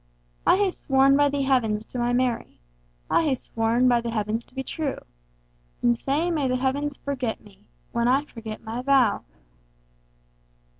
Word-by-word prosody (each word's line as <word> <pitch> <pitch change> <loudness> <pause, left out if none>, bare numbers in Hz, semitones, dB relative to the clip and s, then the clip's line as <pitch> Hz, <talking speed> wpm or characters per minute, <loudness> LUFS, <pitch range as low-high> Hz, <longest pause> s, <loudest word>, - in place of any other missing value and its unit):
I - - +6
hae 400 -2 +2
sworn 270 -3 +3
by 290 0 +4
the 280 0 -1
Heavens 225 -5 +1
to 250 - -6
my 240 0 +1
Mary,I - - -2
hae 290 -4 +2
sworn 230 +1 +1
by 240 -1 +4
the 235 - -4
Heavens 220 +1 -2
to - - -25
be 265 - -3
true; 295 -1 -3 0.9
And 240 0 +4
sae 295 +8 0
may 300 -5 0
the 255 - +1
Heavens 275 +2 -1
forget 260 -5 -3
me, 205 0 -20 0.2
When 235 0 +1
I 270 +3 +3
forget 225 -6 -8
my 230 +2 -4
vow! 260 -5 +3
250 Hz, 160 wpm, -25 LUFS, 225-275 Hz, 0.9 s, I